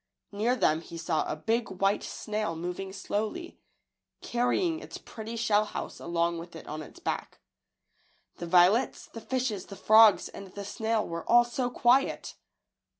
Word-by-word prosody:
Near 220 +5 +1
them 160 -8 +2
he 170 0 -9
saw 165 -1 0
a - - -2
big 225 +9 -1
white 195 +1 +2
snail 210 -5 -3
moving 180 +3 -5
slowly, 215 - -4 0.6
carrying 320 +8 0
its - - -9
pretty 225 +1 -8
shell 215 -2 +3
house 210 - -6
along 170 0 -1
with 170 0 -10
it 160 - -9
on 155 +1 -6
its 155 - -12
back. - - -4 1.0
The 175 - -6
violets, 180 +7 +4
the 230 - -10
fishes, 250 -7 -2
the 200 - -9
frogs, 215 +2 +6
and 195 - -10
the 200 0 -6
snail 220 +1 -1
were 170 0 -6
all 240 +1 +7
so 245 +1 -2
quiet! 250 +2 +2
210 Hz, 155 wpm, -29 LUFS, 175-235 Hz, 1.0 s, all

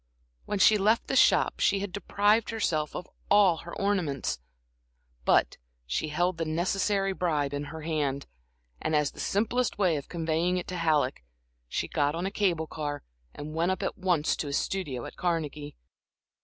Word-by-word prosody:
When 205 - -2
she 210 +2 +6
left 215 +4 +3
the - - -2
shop - - +4
she 195 - +2
had 200 -2 -4
deprived 205 +2 +2
herself 160 -9 -1
of - - -5 0.2
all 200 -5 +5
her 170 +2 -8
ornaments, 180 - -1 0.9
but - - +3 0.3
she 65 - -1
held 175 +3 0
the - - +1
necessary 195 +4 0
bribe 150 -6 0
in 145 0 -3
her 160 +2 -8
hand, 150 -3 -1 0.6
and 155 - 0
as 150 -1 +2
the - - -15
simplest 230 +4 0
way 180 -6 +2
of 140 - -7
conveying 170 +1 0
it 180 - -3
to 185 - -4
Halleck, 150 - +1 0.5
she - - -2
got 145 +1 0
on 175 +2 -2
a 195 - -2
cable 180 -6 +1
car 145 -2 -5 0.3
and 150 +1 -7
went 165 +3 +1
up 190 - -1
at - - -2
once 175 -5 +1
to 150 - -3
his 140 - 0
studio 145 -11 -3
at - - -10
Carnegie. 150 -4 -2
170 Hz, 175 wpm, -28 LUFS, 150-195 Hz, 0.9 s, she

